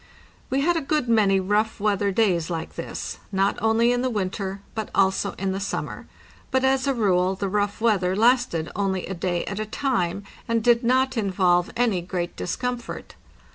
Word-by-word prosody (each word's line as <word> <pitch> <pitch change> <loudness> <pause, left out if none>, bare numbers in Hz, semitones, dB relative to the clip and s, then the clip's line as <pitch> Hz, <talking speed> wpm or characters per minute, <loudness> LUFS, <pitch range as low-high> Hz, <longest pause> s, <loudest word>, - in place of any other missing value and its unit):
We 270 +1 +1
had 345 +4 +2
a - - 0
good 300 -2 0
many 205 -4 +4
rough 210 +4 0
weather 200 -1 +1
days 185 -6 +1
like 165 -2 -4
this, - - -6
not 195 0 +1
only 225 +2 +3
in 245 0 +1
the 255 - 0
winter, 195 -2 -3
but 220 -2 -4
also 190 -1 +2
in 195 0 -2
the 190 - -2
summer; 195 - -4 0.4
but 260 0 +1
as 265 0 +2
a 275 - +3
rule 190 -4 +2
the 195 +1 -2
rough 205 +1 -1
weather 195 -5 +2
lasted 230 -7 +2
only 190 -2 -1
a 190 - -4
day 175 -1 -2
at 200 +1 -4
a 215 - -2
time, 200 -7 -1 0.2
and 230 -1 0
did 240 +1 +4
not 260 +2 +2
involve 185 -4 +2
any 225 -7 +2
great 175 0 -4
discomfort. 250 +5 -4
205 Hz, 180 wpm, -24 LUFS, 190-240 Hz, 0.4 s, many